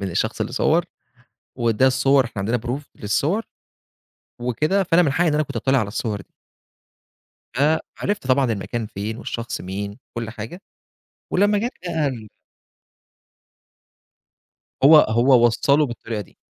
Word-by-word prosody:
من 100 Hz, -1 st, -3 dB
الشخص -, -, -1 dB
اللي -, -, -2 dB
صوّر، -, -, +2 dB, 0.7 s
وده 120 Hz, +2 st, +2 dB
الصور 135 Hz, +1 st, +3 dB
إحنا 115 Hz, -3 st, -7 dB
عندنا 115 Hz, +5 st, 0 dB
proof 125 Hz, +4 st, -4 dB
للصور 150 Hz, -, 0 dB, 1.0 s
وكده، 150 Hz, -, +1 dB
فأنا 175 Hz, -1 st, +4 dB
من 145 Hz, -5 st, +1 dB
حقي 170 Hz, +2 st, +2 dB
إن 150 Hz, -, +1 dB
أنا 150 Hz, -, +2 dB
كنت 140 Hz, -4 st, -7 dB
أتطّلِع 135 Hz, +3 st, +2 dB
على 110 Hz, -, -1 dB
الصور 105 Hz, -1 st, -3 dB
دي. -, -, -17 dB, 1.2 s
فعرفت 155 Hz, +5 st, -1 dB
طبعًا 130 Hz, -2 st, +3 dB
المكان 115 Hz, +2 st, -3 dB
فين، 105 Hz, +1 st, -5 dB
والشخص 115 Hz, -1 st, -5 dB
مين، 100 Hz, +2 st, -4 dB
و 100 Hz, -, -14 dB, 0.2 s
كُلّ 115 Hz, -2 st, -4 dB
حاجة، 115 Hz, -, -8 dB, 0.7 s
ولمّا 205 Hz, +2 st, +3 dB
جات 235 Hz, +4 st, -2 dB
بقى 160 Hz, -4 st, 0 dB
ال 115 Hz, -5 st, -6 dB, 2.6 s
هو 155 Hz, +3 st, +9 dB
هو 120 Hz, -2 st, +5 dB
وصَّله 140 Hz, +6 st, +3 dB
بالطريقة 115 Hz, -3 st, -5 dB
دي. 100 Hz, -, -15 dB
125 Hz, 140 wpm, -22 LUFS, 110-150 Hz, 2.6 s, هو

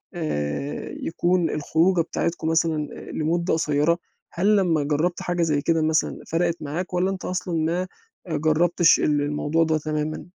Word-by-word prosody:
آآ 140 Hz, -, -3 dB
يكون 175 Hz, 0 st, +1 dB
الخروجة 165 Hz, +4 st, +2 dB
بتاعتكم 165 Hz, 0 st, -2 dB
مثلًا 160 Hz, -2 st, +1 dB
آآ -, -, -9 dB
لمدة 170 Hz, +3 st, 0 dB
قصيرة؟ 160 Hz, +1 st, +2 dB, 0.4 s
هل 200 Hz, +5 st, +3 dB
لمّا 170 Hz, -6 st, +2 dB
جرّبت 155 Hz, +5 st, 0 dB
حاجة 175 Hz, -1 st, -1 dB
زي 150 Hz, -3 st, +1 dB
كده 165 Hz, +1 st, +1 dB
مثلًا 155 Hz, 0 st, +1 dB
فرَقِت 170 Hz, 0 st, 0 dB
معاك 165 Hz, +5 st, -4 dB
والّا 180 Hz, +1 st, +1 dB
أنت 190 Hz, -, -6 dB
أصلًا 180 Hz, -1 st, -2 dB
ما 175 Hz, +3 st, 0 dB, 0.5 s
جرّبتش 165 Hz, +3 st, +3 dB
ال 150 Hz, -1 st, +2 dB
الموضوع 150 Hz, +2 st, +1 dB
ده 160 Hz, -1 st, +1 dB
تمامًا؟ 155 Hz, 0 st, -3 dB
165 Hz, 150 wpm, -24 LUFS, 150-175 Hz, 0.5 s, هل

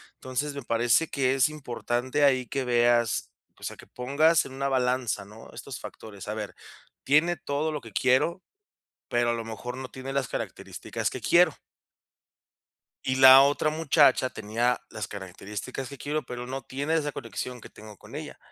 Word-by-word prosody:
entonces 140 Hz, +3 st, -3 dB
me 140 Hz, -, -6 dB
parece 120 Hz, +7 st, +2 dB
que 135 Hz, -1 st, +1 dB
es 130 Hz, -2 st, +4 dB
importante 130 Hz, -2 st, -2 dB
ahí 130 Hz, -3 st, +3 dB
que 135 Hz, +4 st, -2 dB
veas, 120 Hz, -1 st, +2 dB, 0.3 s
o -, -, -16 dB
sea, -, -, -5 dB
que -, -, -13 dB
pongas 150 Hz, +6 st, +2 dB
en 130 Hz, -, -9 dB
una 140 Hz, +1 st, -2 dB
balanza, 125 Hz, -5 st, 0 dB
¿no?, 110 Hz, +3 st, -13 dB
estos -, -, -8 dB
factores. 100 Hz, -3 st, -10 dB
A 105 Hz, -, -2 dB
ver, 110 Hz, -1 st, -5 dB, 0.5 s
tiene 160 Hz, +5 st, +3 dB
todo 145 Hz, +3 st, -2 dB
lo 150 Hz, -2 st, -4 dB
que 115 Hz, -2 st, -12 dB
quiero, 130 Hz, -, +2 dB, 0.7 s
pero 120 Hz, 0 st, +2 dB
a -, -, +2 dB
lo 115 Hz, -1 st, -3 dB
mejor 115 Hz, +3 st, -6 dB
no 130 Hz, -1 st, -6 dB
tiene 130 Hz, +1 st, -7 dB
las 135 Hz, -3 st, -1 dB
características -, -, -4 dB
que -, -, -6 dB
quiero. -, -, +4 dB, 1.5 s
Y 130 Hz, -, 0 dB
la 130 Hz, 0 st, +10 dB
otra 145 Hz, +2 st, +2 dB
muchacha 145 Hz, -4 st, +4 dB
tenía 120 Hz, +1 st, 0 dB
las 105 Hz, -3 st, -5 dB
características 100 Hz, +6 st, -6 dB
que 140 Hz, -, -9 dB
quiero, 150 Hz, +4 st, -2 dB
pero 125 Hz, -1 st, -6 dB
no 135 Hz, +2 st, -5 dB
tiene 140 Hz, +5 st, -3 dB
esa 150 Hz, -2 st, +1 dB
conexión 125 Hz, 0 st, -6 dB
que -, -, -12 dB
tengo 105 Hz, -1 st, -13 dB
con -, -, -15 dB
ella. -, -, -7 dB
130 Hz, 175 wpm, -27 LUFS, 120-140 Hz, 1.5 s, la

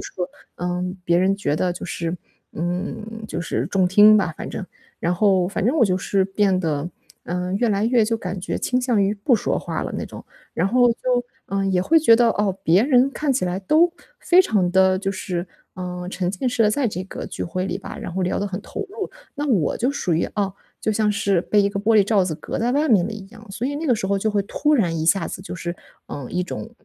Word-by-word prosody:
是， -, -, -8 dB, 0.5 s
呃， 180 Hz, 0 st, -2 dB, 0.2 s
别 170 Hz, 0 st, +3 dB
人 195 Hz, +2 st, +2 dB
觉 145 Hz, -7 st, -1 dB
得 180 Hz, +2 st, +1 dB
就 175 Hz, -, -7 dB
是 170 Hz, -1 st, -3 dB, 0.4 s
嗯， 210 Hz, +6 st, -4 dB
就 -, -, -3 dB
是 -, -, -2 dB
中 190 Hz, -2 st, +2 dB
听 210 Hz, +3 st, +7 dB
吧， 175 Hz, -6 st, 0 dB
反 -, -, -5 dB
正。 200 Hz, -, -5 dB, 0.4 s
然 175 Hz, +1 st, +1 dB
后 190 Hz, -1 st, +3 dB
反 200 Hz, 0 st, -2 dB
正 260 Hz, +7 st, +2 dB
我 255 Hz, -, +5 dB
就 185 Hz, -3 st, +1 dB
是 195 Hz, 0 st, +1 dB
变 195 Hz, -1 st, +1 dB
得， 155 Hz, -2 st, -1 dB, 0.4 s
嗯， 180 Hz, +1 st, -2 dB
越 240 Hz, 0 st, +2 dB
来 205 Hz, 0 st, +1 dB
越 235 Hz, -1 st, +3 dB
就 230 Hz, +1 st, 0 dB
感 190 Hz, -3 st, -5 dB
觉 -, -, -3 dB
倾 250 Hz, 0 st, 0 dB
向 240 Hz, -5 st, +2 dB
于 195 Hz, +1 st, +2 dB
不 215 Hz, +5 st, +2 dB
说 -, -, -1 dB
话 -, -, -4 dB
了 -, -, -5 dB
那 -, -, -3 dB
种， -, -, -10 dB, 0.3 s
然 -, -, +1 dB
后 245 Hz, +1 st, +4 dB
就， -, -, -15 dB, 0.5 s
呃， 195 Hz, 0 st, -1 dB
也 185 Hz, -2 st, +2 dB
会 325 Hz, -, +4 dB
觉 290 Hz, -7 st, +6 dB
得， 235 Hz, 0 st, +4 dB
哦， 200 Hz, -3 st, 0 dB
别 175 Hz, +5 st, +5 dB
人 265 Hz, -1 st, +4 dB
看 290 Hz, 0 st, -1 dB
起 250 Hz, -, 0 dB
来 180 Hz, +1 st, -1 dB
都 325 Hz, -, +3 dB, 0.3 s
非 360 Hz, +1 st, +5 dB
常 190 Hz, -, +1 dB
地 190 Hz, 0 st, +4 dB
就 195 Hz, 0 st, -2 dB
是， 180 Hz, -1 st, -4 dB, 0.3 s
呃， 180 Hz, -1 st, -5 dB
沉 180 Hz, -2 st, -2 dB
浸 205 Hz, +7 st, -2 dB
式 240 Hz, -2 st, +1 dB
地 210 Hz, -, +4 dB
在 255 Hz, +2 st, +1 dB
这 185 Hz, -2 st, -5 dB
个 -, -, -7 dB
聚 -, -, -6 dB
会 185 Hz, +2 st, -3 dB
里 -, -, -2 dB
吧， -, -, -8 dB
然 175 Hz, -, -6 dB
后 190 Hz, -, -1 dB
聊 180 Hz, -, 0 dB
得 205 Hz, -, -1 dB
很 190 Hz, -2 st, -4 dB
投 -, -, -6 dB
入。 415 Hz, -1 st, -5 dB, 0.2 s
那 290 Hz, +1 st, -3 dB
我 200 Hz, -, +1 dB
就 250 Hz, +3 st, +1 dB
属 185 Hz, -11 st, -1 dB
于， 165 Hz, -, +1 dB
哦， 195 Hz, -2 st, -1 dB, 0.3 s
就 -, -, 0 dB
像 210 Hz, 0 st, +1 dB
是 200 Hz, -3 st, +1 dB
被 210 Hz, -, +2 dB
一 200 Hz, -, +3 dB
个 200 Hz, -, -4 dB
玻 220 Hz, +2 st, +2 dB
璃 210 Hz, -, +7 dB
罩 205 Hz, -3 st, +3 dB
子 170 Hz, -, -2 dB
隔 -, -, -5 dB
在 240 Hz, +2 st, +1 dB
外 295 Hz, +3 st, +1 dB
面 200 Hz, -7 st, +4 dB
的 220 Hz, -, -5 dB
一 205 Hz, -3 st, -8 dB
样， 225 Hz, +1 st, -15 dB
所 200 Hz, +6 st, -3 dB
以 285 Hz, -, -2 dB
那 320 Hz, +2 st, -3 dB
个 250 Hz, -, +4 dB
时 215 Hz, -, -3 dB
候 200 Hz, 0 st, +1 dB
就 215 Hz, +2 st, 0 dB
会 205 Hz, -, +1 dB
突 300 Hz, +9 st, 0 dB
然 170 Hz, -, +1 dB
一 155 Hz, -, -1 dB
下 195 Hz, +4 st, +2 dB
子 185 Hz, -, -7 dB
就 185 Hz, -, -7 dB
是， 170 Hz, 0 st, -5 dB, 0.3 s
嗯， 140 Hz, -4 st, -6 dB
一 180 Hz, -, 0 dB
种 205 Hz, +4 st, -6 dB
195 Hz, 270 characters per minute, -22 LUFS, 180-225 Hz, 0.5 s, 听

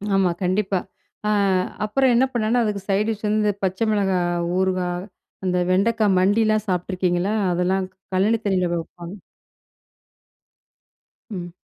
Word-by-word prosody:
ஆமா, 190 Hz, -2 st, +3 dB
கண்டிப்பா. 190 Hz, +1 st, +1 dB, 0.5 s
அ -, -, +2 dB, 0.6 s
அப்புறம் 260 Hz, +5 st, +2 dB
என்ன 250 Hz, +3 st, +4 dB
பண்ணேன்னா, 235 Hz, +1 st, +1 dB
அதுக்கு 210 Hz, -2 st, -2 dB
சைட் 200 Hz, +2 st, +2 dB
டிஷ் 215 Hz, -1 st, -2 dB
வந்து 210 Hz, 0 st, +2 dB
பச்சை 190 Hz, +4 st, 0 dB
மிளகாய் 180 Hz, -4 st, 0 dB
ஊறுகாய், 185 Hz, -1 st, -1 dB, 0.4 s
அந்த 180 Hz, -1 st, +1 dB
வெண்டைக்காய் 210 Hz, +1 st, +2 dB
மண்டிலாம் 215 Hz, +2 st, +2 dB
சாப்ட்டுருக்கீங்களா? 180 Hz, +1 st, 0 dB, 0.2 s
அதெல்லாம் 185 Hz, +2 st, 0 dB, 0.3 s
கழனி 210 Hz, +5 st, +2 dB
தண்ணில 185 Hz, -3 st, +1 dB
வப்பாங்க. 170 Hz, +3 st, -7 dB, 2.1 s
ம். 175 Hz, -5 st, -6 dB
195 Hz, 115 wpm, -22 LUFS, 180-215 Hz, 2.1 s, என்ன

